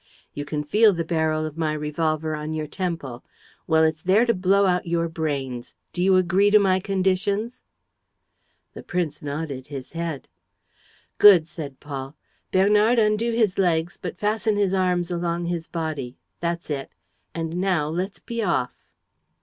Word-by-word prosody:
You 145 - -5
can 150 0 -3
feel 210 +7 +4
the 170 -1 -2
barrel 160 -1 0
of 155 +1 -7
my 155 -2 0
revolver 155 +1 -1
on 155 +1 -4
your 155 -1 -2
temple: 165 -8 -4 0.4
Well, 160 -1 +4
it's 160 0 +1
there 195 +7 +4
to 235 - +3
blow 195 +1 +3
out 180 -2 +1
your 170 0 0
brains. 140 -7 -4 0.2
Do 175 - -3
you 190 +1 +4
agree 185 +3 +3
to 210 - +7
my 190 -2 +3
conditions?" 195 +4 -1 1.1
The - - -8
prince 165 -4 -3
nodded 145 -2 -5
his 135 -3 -8
head. 165 -4 -4 0.9
"Good," 185 -6 +8
said 145 -6 -8
Paul. 140 -1 -7 0.4
"Bernard, 210 +5 +4
undo 220 +1 +2
his 220 -5 +1
legs, 170 -2 +1
but - - -5
fasten 215 +2 0
his 200 -2 +1
arms 180 -2 +1
along 170 0 -1
his 170 -1 -3
body.... 155 -7 -4 0.2
That's 170 -1 -3
it.... 135 -2 -3 0.5
And 165 0 -3
now 180 -6 +1
let's 180 +5 -3
be 235 -1 -5
off." 170 - 0
170 Hz, 160 wpm, -24 LUFS, 155-190 Hz, 1.1 s, Good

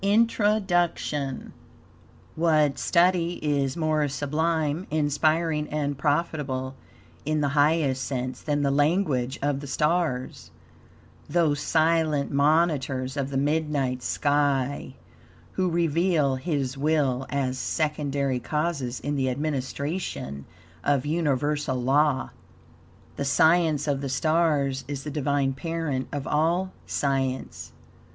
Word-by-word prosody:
INTRODUCTION 195 - +1
TO - - -11
VOL. - - -13
II - - -13 1.2
What 135 - -8
study 175 -1 +3
is 140 -1 0
more 155 -2 +1
sublime, 150 +4 -1
inspiring 155 +1 +1
and 145 -1 -1
profitable, 145 -3 -1 0.5
in 155 +1 0
the 145 - +1
highest 145 -2 +2
sense, 130 0 -4
than 145 -1 -1
the 140 - +2
"language 145 -4 +1
of 145 -1 0
the 145 - -8
stars" 150 -2 -1 0.8
those 155 -2 +2
silent 160 -3 +1
monitors 140 -3 +1
of 140 -2 -2
the 135 - -2
midnight 145 -3 0
sky, 145 -1 0 0.6
who 185 -1 0
reveal 165 -4 +1
HIS 135 -2 -2
WILL 140 -4 +1
as 130 -1 -1
secondary 140 -3 -1
causes 150 -3 -2
in 145 +1 -2
the 130 -2 0
administration 140 - -3 0.4
of 140 -2 +1
universal 145 -3 0
law? 135 +2 +2 0.9
The 140 - -2
science 160 +1 +3
of 140 -2 0
the 140 - -3
stars 145 -2 +1
is 140 -1 -5
the 150 - -5
Divine 140 -2 0
parent 160 -3 -3
of 145 -1 -4
all 170 +5 +1 0.2
science. 135 -2 -2
145 Hz, 115 wpm, -26 LUFS, 135-160 Hz, 1.2 s, study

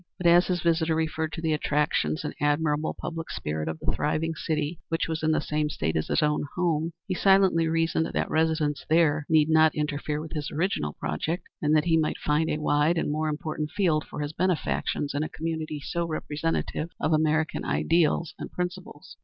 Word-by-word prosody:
But, 180 - -6
as 175 +1 +6
his 180 -3 -1
visitor 165 -1 +2
referred 160 0 -1
to 165 - -5
the 160 -1 +2
attractions 145 - 0
and - - -4
admirable 150 +1 +1
public 165 -1 -5
spirit 75 +1 -3
of 80 - -3
the - - -2
thriving 160 +2 -1
city, 155 0 -2
which 165 - 0
was 160 -1 -3
in 155 - +1
the 160 - +3
same 150 0 -1
State 80 - -2
as 80 - 0
his - - +1
own 150 0 +1
home, 165 -3 +1 0.2
he 190 - -1
silently 190 -3 +4
reasoned 165 0 +1
that - - -1
residence 160 -2 +1
there 155 -2 +3
need 155 -2 +5
not 160 -1 +4
interfere 150 0 -2
with 155 0 -7
his 150 -2 -3
original 150 - -1
project, 165 - -3 0.2
and 150 +1 +3
that 155 - +3
he 165 -2 +3
might 155 - 0
find 150 +2 +1
a - - 0
wide 150 +2 +2
and 160 - 0
more 155 +1 0
important 155 0 -3
field 170 -7 +1
for - - -7
his 145 +1 -3
benefactions 170 -4 -1
in 145 - -1
a 155 - -2
community 160 -2 -4
so 170 +4 -2
representative 155 +1 -2
of 160 - +1
American 155 0 +1
ideas 165 0 +1
and - - -6
principles. 180 -3 -6
155 Hz, 195 wpm, -27 LUFS, 150-165 Hz, 0.2 s, as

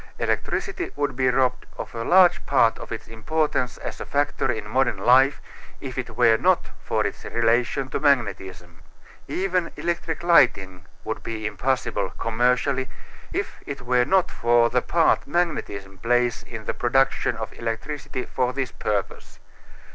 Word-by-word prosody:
Electricity 385 -2 -2
would 145 -3 -1
be 130 0 +2
robbed 125 0 +1
of - - -7
a 115 -1 -4
large 180 +5 +5
part 120 -5 +3
of - - -10
its 115 - -6
importance 125 +2 -1
as - - -7
a - - -4
factor 145 -2 0
in 110 -3 -5
modern 125 -1 +1
life 130 +7 +4 0.4
if 130 -2 -7
it 130 -1 -5
were 115 -2 +5
not 185 +6 +2
for - - 0
its - - -4
relation 120 +3 +1
to 130 - -3
magnetism. 95 - -1 0.5
Even 180 -2 -1
electric 170 -1 -3
lighting 95 - +3 0.2
would - - -4
be 110 -1 -5
impossible, 130 +4 -1
commercially, 125 +3 +1 0.4
if - - -4
it 140 -1 -5
were 125 0 +3
not 190 +3 +2
for 120 0 +3
the 125 - +2
part 165 +4 +2
magnetism 100 - -2
plays 120 +2 +1
in 115 -2 -9
the - - -2
production 135 +2 +1
of - - -6
electricity 130 +4 -4
for 125 0 -1
this 130 -2 -3
purpose. 100 -4 -4
125 Hz, 150 wpm, -24 LUFS, 115-145 Hz, 0.5 s, large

